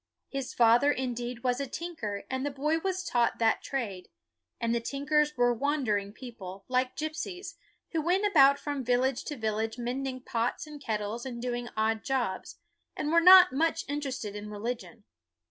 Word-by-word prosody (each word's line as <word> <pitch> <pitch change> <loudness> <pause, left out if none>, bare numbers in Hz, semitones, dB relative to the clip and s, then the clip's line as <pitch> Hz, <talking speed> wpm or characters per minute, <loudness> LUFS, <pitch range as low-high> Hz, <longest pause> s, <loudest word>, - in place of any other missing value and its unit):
His 275 -2 -4
father, 240 +4 +5
indeed, 245 -2 -3
was 250 0 +1
a 280 - -3
tinker, 250 -11 -5
and 260 0 -3
the 285 - 0
boy 300 +4 0
was 375 +1 -2
taught 240 -8 +1
that 225 -1 +2
trade; 210 -9 -4 0.5
and 230 0 0
the 235 - +1
tinkers 295 +4 0
were 245 0 +4
wandering 235 -7 0
people, 200 -5 -10
like 255 0 0
gipsies, 315 +5 -5 0.4
who 325 - 0
went 365 +6 +1
about 280 -8 +6
from 285 -3 -4
village 250 +1 +1
to 295 - -5
village 220 0 -2
mending 255 +2 -3
pots 235 +5 -2
and 300 -1 -10
kettles 215 +1 -3
and 245 -3 -6
doing 240 0 -3
odd 220 0 +1
jobs, 245 -8 -2 0.4
and 300 - -1
were 335 0 +5
not 365 -2 +9
much 325 +3 +1
interested 270 -7 -4
in 210 0 -6
religion. 225 +1 -5
255 Hz, 165 wpm, -29 LUFS, 230-290 Hz, 0.5 s, not